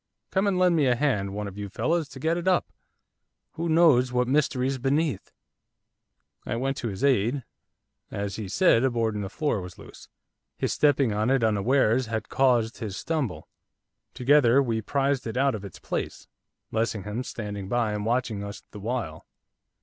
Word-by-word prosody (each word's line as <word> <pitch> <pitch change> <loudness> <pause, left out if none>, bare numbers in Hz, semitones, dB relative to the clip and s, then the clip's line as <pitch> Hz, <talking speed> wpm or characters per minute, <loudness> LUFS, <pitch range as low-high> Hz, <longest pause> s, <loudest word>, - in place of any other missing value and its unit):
Come 195 +1 +1
and 195 -2 +1
lend 180 -1 +4
me 150 -4 +3
a 125 - +3
hand, 110 -8 0
one 105 +1 -4
of 100 +1 -9
you 100 -1 -5
fellows, 160 - -1
to 130 - -10
get 160 +5 +1
it 175 +1 -4
up. 185 -1 +3 0.9
Who 165 +1 -3
knows 155 -7 +5
what 125 0 +1
mystery's 135 -1 +1
beneath?' 140 - 0 1.1
I - - -3
went 135 +3 -1
to 120 - -3
his 105 +3 -5
aid. 130 0 +2 0.7
As 100 0 -4
he 110 -3 -5
said, 120 - +3
a 130 - +3
board 115 -2 0
in 105 - -3
the 95 - -4
floor 145 - -1
was 90 0 -9
loose. - - -13 0.5
His - - -1
stepping 140 -6 +3
on 105 +3 0
it 135 -3 +2
unawares 115 +3 +2
had 110 -1 -4
caused 120 -4 +2
his 105 -5 -5
stumble. 150 - -3 0.7
Together 130 -1 +4
we 115 -5 0
prised 140 +2 0
it 115 - -4
out 135 0 +3
of 105 -2 -5
its 100 -4 -9
place, - - -5 0.4
Lessingham 110 0 -2
standing 105 -5 -6
by 115 -2 +1
and 105 0 -3
watching 115 -2 -1
us 100 +1 -8
the 105 - -9
while. 110 -7 -4
120 Hz, 180 wpm, -26 LUFS, 105-140 Hz, 1.1 s, knows